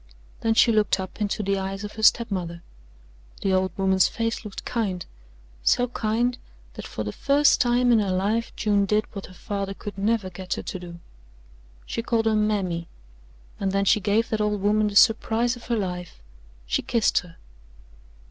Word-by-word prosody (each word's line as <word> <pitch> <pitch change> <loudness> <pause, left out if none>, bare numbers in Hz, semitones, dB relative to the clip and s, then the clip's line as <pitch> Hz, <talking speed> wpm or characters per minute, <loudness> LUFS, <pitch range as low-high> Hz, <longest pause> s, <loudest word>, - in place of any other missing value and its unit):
Then 225 0 +1
she 230 - +5
looked 215 -3 +2
up 190 +3 -7
into 210 +1 -1
the 195 0 0
eyes 195 +1 -4
of 205 - -5
her 220 - -8
step 230 +1 +4
mother. 170 -3 -4 0.8
The 195 - +1
old 185 -1 +1
woman's 190 -1 +3
face 230 0 -3
looked 210 -3 -8
kind 195 -7 -2 0.6
so 245 - +3
kind 240 +2 -1 0.3
that - - -8
for 110 - -5
the 105 - -4
first 285 - +3
time 245 0 +3
in 230 - +5
her 205 -2 0
life 210 +5 0
June 205 -2 +1
did 210 +2 +2
what 195 -2 -7
her 185 - -14
father 195 0 -4
could 205 -1 -8
never 205 -2 0
get 185 0 -4
her - - -6
to 185 - -5
do: 170 -1 -10 0.9
she - - -3
called 230 -1 0
her 220 - +3
"Mammy," 195 -6 0 0.7
and 195 -1 0
then 195 0 +1
she 215 - +4
gave 210 +4 +1
that 220 -1 -1
old 210 -1 0
woman 210 +2 +2
the 205 - -4
surprise 225 +2 +4
of 240 - -13
her 235 -2 0
life 180 - -4 0.5
she - - 0
kissed 230 -2 +2
her. 170 -2 -13
210 Hz, 185 wpm, -25 LUFS, 190-225 Hz, 0.9 s, she